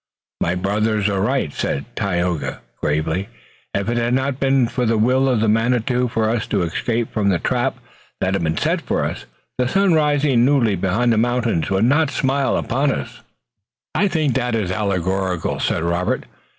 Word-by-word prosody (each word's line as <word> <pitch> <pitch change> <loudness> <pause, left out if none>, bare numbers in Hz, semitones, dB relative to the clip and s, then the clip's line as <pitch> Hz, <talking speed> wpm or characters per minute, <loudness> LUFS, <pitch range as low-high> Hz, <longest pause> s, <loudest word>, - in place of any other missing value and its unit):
"My 85 - +1
brothers 105 +3 0
are 100 -1 0
right," 125 - 0
said 70 - -2
Tayoga 90 -4 -1 0.2
gravely. 80 +6 -1 0.5
"If 100 +1 -1
it 120 +1 0
had 120 +1 +1
not 135 0 -1
been 135 -2 +3
the 115 -1 0
will 130 +5 +3
of 110 -3 +2
Manitou 125 +3 +1
for 115 -2 0
us 115 +1 -1
to 95 - 0
escape 115 +7 -2
from 105 -2 +1
the 95 - +2
trap - - -1 0.4
that 95 - 0
had 100 - 0
been 80 -1 -1
set - - 0
for - - -1
us - - -5 0.3
the 125 - +2
sun 195 +5 +3
rising 145 -5 +3
newly 125 -6 +3
behind 105 +7 +1
the 110 - +2
mountains 120 -8 0
would 95 +3 +2
not 145 +4 +3
smile 135 0 0
upon 135 +3 0
us." - - -5 0.7
"I 205 - +2
take 155 -7 0
that 125 -2 0
as 100 -5 -1
allegorical," 95 -2 -1
said 80 - 0
Robert. 85 +2 0
115 Hz, 175 wpm, -20 LUFS, 95-130 Hz, 0.7 s, been